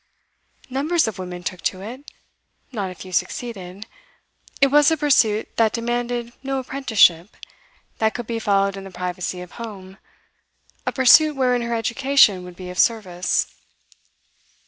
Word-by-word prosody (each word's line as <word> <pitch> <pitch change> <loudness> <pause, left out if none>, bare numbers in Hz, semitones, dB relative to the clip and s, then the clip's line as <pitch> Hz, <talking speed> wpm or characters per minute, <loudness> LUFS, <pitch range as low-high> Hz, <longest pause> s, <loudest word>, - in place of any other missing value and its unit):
Numbers 290 +4 +1
of 210 -3 -5
women 180 -1 -7
took 180 0 -5
to 185 0 -2
it; 255 +7 -9 0.6
not 205 -6 -3
a 185 - -9
few 185 +1 -11
succeeded. 195 -1 -4 0.7
It 275 -1 +4
was 295 +1 +6
a 320 - +1
pursuit 235 -8 +2
that 225 -2 +3
demanded 240 0 -2
no 270 0 -2
apprenticeship, 225 -9 +2 0.6
that 220 0 +1
could 240 - -4
be 230 0 -3
followed 200 -2 +1
in 195 - -7
the 195 - -9
privacy 180 0 -4
of 180 - -10
home, 195 -4 -9 0.9
a - - +2
pursuit 295 +4 +6
wherein 250 -2 +1
her 235 0 -2
education 230 -4 +3
would 180 -1 -11
be 180 0 -8
of 180 - -7
service. 185 -6 +1
225 Hz, 145 wpm, -22 LUFS, 185-255 Hz, 0.9 s, was